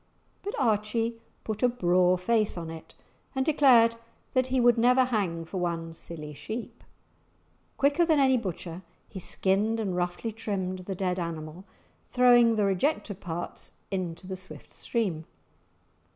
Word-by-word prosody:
But 405 - -4
Archie 230 0 0 0.2
put 215 -1 -4
a 250 - +5
braw 180 -5 +3
face 215 +2 +1
on 165 -1 -5
it, 165 0 -11 0.4
and 265 0 +1
declared 245 -7 +5 0.4
that 255 -1 +2
he 260 0 +1
would 240 -1 +5
never 250 +2 +5
hang 190 -9 -1
for 185 - -6
one 165 -2 -2
silly 155 -2 -8
sheep. 220 - -7 0.9
Quicker 285 +5 +3
than 320 -3 +3
any 265 -1 +5
butcher 185 -6 -4 0.3
he 190 - -8
skinned 200 +5 0
and 195 -5 -1
roughly 180 +5 -2
trimmed 195 -4 -3
the 185 +1 -5
dead 185 0 -1
animal, 165 +1 -5 0.4
throwing 240 -2 +5
the 210 -2 +2
rejected 200 - 0
parts 175 0 -5 0.2
into 185 -2 -3
the 190 0 -5
swift 185 0 -10
stream. 185 -10 -2
200 Hz, 145 wpm, -28 LUFS, 180-240 Hz, 0.9 s, a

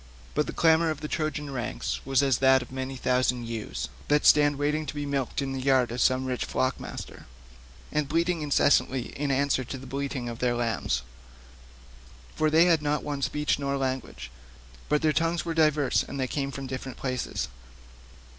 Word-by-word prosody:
But - - +1
the - - -3
clamour 160 0 +4
of 155 - -3
the 150 - -3
Trojan 150 -2 -3
ranks 125 0 -3
was 135 0 +2
as 135 -3 +2
that 130 -1 +5
of 125 - -15
many 130 0 -4
thousand 125 -1 +1
ewes 105 - -4 0.2
that 150 0 +2
stand 145 -1 +6
waiting 150 +2 -1
to 135 - -5
be 145 0 -3
milked 140 -1 -1
in 135 - -3
the 135 - -3
yards 130 -3 +3
of 120 - -2
some 130 0 +3
rich 125 -1 -2
flock 130 0 -1
master, - - -8 0.6
and 150 -2 0
bleat 165 +2 +2
incessantly 145 -6 +2
in 145 +1 -2
answer 135 -1 +1
to 130 +2 -6
the 135 - -10
bleating 135 -1 -3
of 120 0 -6
their 125 -1 +1
lambs; 115 - -1 1.3
for 155 - +2
they 160 +3 +5
had 165 -3 +4
not 150 0 0
one 145 -1 -3
speech 150 +1 0
nor 140 0 -1
language, 130 - -4 0.6
but 150 +1 +2
their 155 -1 +3
tongues 165 +1 0
were 165 - -2
diverse, 155 -3 +3
and 140 - -6
they 130 - +1
came 140 +1 -2
from 140 0 -6
many - - -8
different 130 0 -6
places. 130 -2 -3
135 Hz, 195 wpm, -27 LUFS, 130-150 Hz, 1.3 s, stand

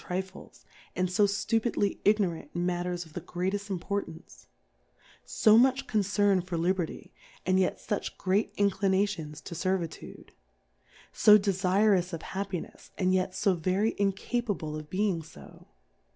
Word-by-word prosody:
Trifles, 190 +1 -6 0.3
and 180 0 -1
fo 205 +2 +4
ftupidly 205 0 0
Ignorant 190 -8 +1
in 175 0 -1
Matters 175 0 -2
of 160 - -17
the 180 - -5
grcatefl: 190 +5 -3
Importance? 170 - -5 0.8
So 215 +1 +5
much 265 +2 +3
Concern 205 -3 +2
for 175 -1 -4
Liberty, 175 0 -2 0.3
and 185 0 +3
yet 185 - +1
fuch 210 - -4
great 195 +3 0
Inclinations 195 -5 0
to 175 - -8
Servitude? 175 -1 -4 0.8
So 210 0 +7
de 200 -1 0
fu'ous 190 0 +2
of 165 - -4
Happinefs, 190 -1 -6
and 185 -1 +2
yet 185 0 0
fo 195 0 +2
very 185 +6 0
in 200 -1 +1
capable 200 -8 -3
of 155 -1 -8
being 190 -3 0
fo 75 - -15
190 Hz, 135 wpm, -29 LUFS, 175-205 Hz, 0.8 s, So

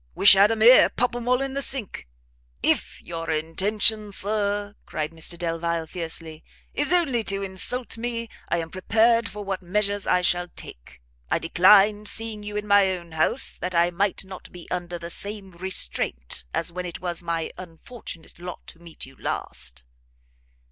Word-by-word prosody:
wish 200 - +9
had 200 +2 +6
'em 225 -1 -1
here! 245 +3 +8
pop 245 0 0
'em 240 0 -5
all 250 +2 +3
in 270 -1 -4
the 280 - -2
sink!" 260 - -1 0.6
"If - - +1
your 165 -1 -5
intention, 200 +7 +1
Sir," 205 0 -1
cried 155 0 -3
Mr 165 +1 -4
Delvile, 170 -1 -1
fiercely, 160 -1 -5 0.3
"is 290 - +1
only 310 -10 +3
to 195 0 -1
insult 225 +5 -3
me, 230 0 -3 0.2
I - - +2
am 165 -1 -4
prepared 225 +4 +3
for 205 +1 -7
what 195 -1 -3
measures 200 +2 -1
I 180 0 +3
shall 175 0 +1
take. - - -11 0.3
I - - +2
declined 205 +5 +5
seeing 225 -1 -2
you 210 0 -5
in 210 - -3
my 205 -1 +5
own 170 -1 -13
house, 160 +11 +2
that 180 0 -3
I 170 +1 +4
might 195 +2 -1
not 190 -1 -10
be 175 -1 -11
under 175 -1 -3
the 170 0 -7
same 200 0 -7
restraint 60 - -2
as 170 - -2
when 180 +1 -4
it 170 - -7
was 175 -1 -2
my 165 -1 -2
unfortunate 170 0 -10
lot 180 0 -8
to 165 - -15
meet 170 -1 -8
you 135 0 -15
last." 60 0 -4
185 Hz, 175 wpm, -25 LUFS, 170-210 Hz, 0.6 s, wish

